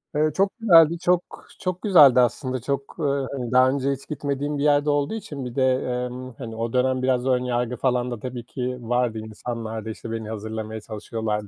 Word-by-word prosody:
Eee, 155 +1 +2
çok 195 +1 +2
güzeldi, 170 -6 +6
çok 180 0 +2 0.4
çok 185 -1 -3
güzeldi 145 - +7
aslında. 130 +1 0
Çok, 140 +1 -3 0.4
hani, 125 -4 -4
daha 130 +1 +5
önce 140 0 0
hiç 135 0 -6
gitmediğim 145 -1 -2
bir 140 - -1
yerde 145 0 +3
olduğu 145 +6 +1
için 145 - -6
bir 125 -1 -7
de, 130 -1 +3
emm, 125 0 -4
hani, 115 -3 -7
o 115 0 -3
dönem 130 0 +2
biraz 130 -1 +1
ön 125 -1 +2
yargı 125 -1 -1
falan 125 -1 0
da 120 - -5
tabii 125 0 -6
ki 125 0 -4
vardı 120 -1 0
insanlarda. 110 0 -6
İşte, 110 +1 -7
beni 110 -1 -4
hazırlamaya 110 0 -5
çalışıyorlardı. 105 0 -4
125 Hz, 190 wpm, -24 LUFS, 115-140 Hz, 0.4 s, güzeldi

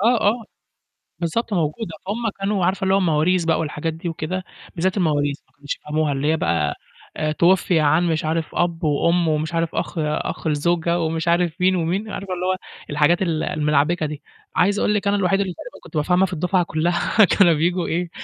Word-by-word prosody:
آه، 230 +2 +3
آه، 225 +3 +1 0.8
بالضبط 205 +6 -2
موجودة. 170 +4 -1
فهُم 220 +3 -2
كانوا 195 -2 0
عارفة 190 +1 0
اللي 190 0 +2
هو - - +5
المواريث 175 0 +2
بقى 165 0 +1
والحاجات 160 +1 -3
دي 170 +2 -5
وكده؟ 170 +3 -4 0.3
بالذات 185 +3 0
المواريث، 145 -5 +1
ما - - -34
كانوش 145 0 -5
يفهموها. 150 0 -1
اللي 135 +2 -1
هي 160 - +1
بقى 85 - 0 0.6
تُوُفِّيَ 175 -1 +4
عن 155 +3 +3
مش 160 -1 0
عارف 160 0 -2
أَبّ، 170 -1 0
وأُمّ، 170 +3 +2
ومش 155 +1 -1
عارف 165 0 -1
أَخ - - -3
أَخ 150 +1 -2
الزوجة، 170 +3 +1
ومش 160 0 -2
عارف 170 +1 +1
مين 185 +1 +4
ومين، 185 +5 -1
عارفة 195 -2 -5
اللي 180 0 -3
هو 185 - +1 0.3
الحاجات 150 +4 +2
ال 165 -4 0
الملعبِكة 150 +2 +1
دي. 150 0 -6 0.3
عايز 200 +3 +2
أقول 210 - +2
لِك 205 -1 -1
أنا 200 - +3
الوحيد 195 0 +2
اللي 190 -2 -1
تقريبًا - - -11
كنت 160 - -7
بافهمها 180 +5 +3
في 190 - -6
الدُفعة 180 +2 +1
كلّها، 175 +6 +2
كانوا 180 -1 +4
بييجوا 170 +3 0
إيه، 175 +1 -1
170 Hz, 195 wpm, -21 LUFS, 155-185 Hz, 0.8 s, هو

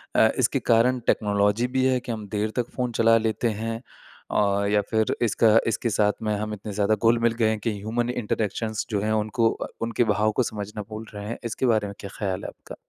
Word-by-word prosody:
अ, - - +6
इसके - - +2
कारण 125 +2 +4
टेक्नोलॉज़ी 105 +3 +2
भी 130 - +3
है 130 -1 +3
कि 120 - -6
हम 110 -2 -5
देर 105 +1 -1
तक 120 -2 -1
फ़ोन 125 -1 -1
चला 115 0 +4
लेते 110 +1 0
हैं। 115 +1 -3 0.5
और 100 -1 +2
या 105 0 +3
फ़िर 110 -1 +1
इसका 115 0 +3 0.2
इसके 115 +1 0
साथ 105 0 +2
में 105 - 0
हम 105 +1 -3
इतने 105 +1 -7
ज़्यादा 105 +1 +2
घुल-मिल 115 +1 +3
गए 110 - +4
हैं 110 - -1
कि 110 +2 -1
ह्यूमन 115 +3 -2
इंटरैक्शंस 110 -2 -2
जो 105 -3 -1
है 110 +1 0
उनको 110 +2 +1
अ, - - -5
उनके 115 +1 +1
भाव 110 +1 +2
को - - +3
समझना 105 -1 -5
भूल 110 +1 -6
रहे 105 0 -7
हैं 115 - -4
इसके 115 +3 -2
बारे 110 -4 +2
में 100 - -7
क्या 100 - -7
ख़्याल 95 -3 -2
है - - -4
आपका? - - -12
110 Hz, 225 wpm, -25 LUFS, 105-115 Hz, 0.5 s, अ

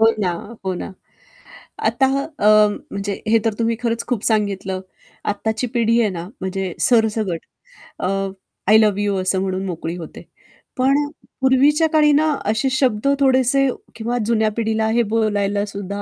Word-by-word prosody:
हो 225 - +6
ना, 185 -3 +1 0.3
हो 190 - -1
ना. 185 - -6 0.9
आता 265 - +3 0.3
अ, 210 0 +6 0.2
म्हणजे 200 0 -4
हे 225 +1 +4
तर 225 - +2
तुम्ही 230 0 +1
खरंच 230 -1 -1
खूप 240 -4 -2
सांगितलं. 195 -3 0 0.5
आत्ताची 220 +4 -2
पिढी 230 -1 +2
आहे 215 - +2
ना, 175 -2 -6
म्हणजे 190 -1 -3
सरसकट 220 -7 +2 0.6
अ, - - -2 0.6
"आय 215 - +7
लव्ह 210 -2 +3
यू" 205 -1 0
असं 185 0 0
म्हणून 190 0 -2
मोकळी 170 -2 -4
होते. 165 -3 -9 0.6
पण 265 +2 +3
अ, - - -7 0.3
पूर्वीच्या 280 +5 +4
काळी 300 -1 +5
ना, 310 +2 +3
असे 220 +6 +1
शब्द 260 -3 +1
थोडेसे 265 0 +3 0.3
किंवा 235 +2 -2
जुन्या 220 -1 +2
पिढीला 220 -1 0
हे 235 +1 +3
बोलायला 205 -2 +1
सुद्धा 200 0 -6
220 Hz, 155 wpm, -20 LUFS, 200-240 Hz, 0.9 s, आय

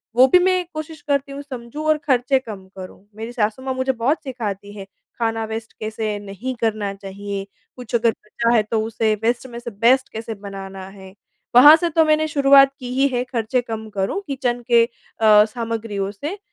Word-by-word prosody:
वो 255 +2 +7
भी 360 +7 +6
मैं 370 0 +2
कोशिश 310 0 -7
करती 280 -1 -1
हूँ 280 +1 -6
समझूँ 270 +2 -7
और 310 0 +4
खर्चे 260 0 +2
कम 205 -7 -10
करूँ, 185 +1 -10
मेरी 225 +2 -6
सासु 220 +1 -1
माँ 265 0 -2
मुझे 260 +1 0
बहुत 265 +7 -1
सिखाती 205 -6 -5
है, 195 - -7 0.3
खाना 225 -1 0
वेस्ट 220 0 -6
कैसे 215 -1 -3
नहीं 205 +6 -6
करना 210 -3 -1
चाहिए? 195 0 -6 0.3
कुछ 245 -2 -11
अगर 230 -1 +3
बचा 230 +2 -3
है, 220 - +5
तो 220 +1 -1
उसे 220 -1 0
वेस्ट 240 +2 0
में 235 -1 -8
से 235 0 -7
बेस्ट 240 +6 +3
कैसे 225 +1 -5
बनाना 195 -1 -8
है। 190 -1 -13 0.4
वहाँ 290 +5 +10
से 345 +1 -1
तो 320 0 +3
मैंने 310 0 +2
शुरुआत 275 -2 +6
की 250 - -7
ही 270 +2 +3
है 250 -2 -1
खर्चे 245 0 -1
कम 220 -2 -6
करूँ, 200 - -2
किचन 250 -3 -2
के 235 -1 +7
अ, 215 -2 +3
सामग्रियों 225 -3 -4
से, 295 - -6
235 Hz, 190 wpm, -21 LUFS, 210-265 Hz, 0.4 s, वहाँ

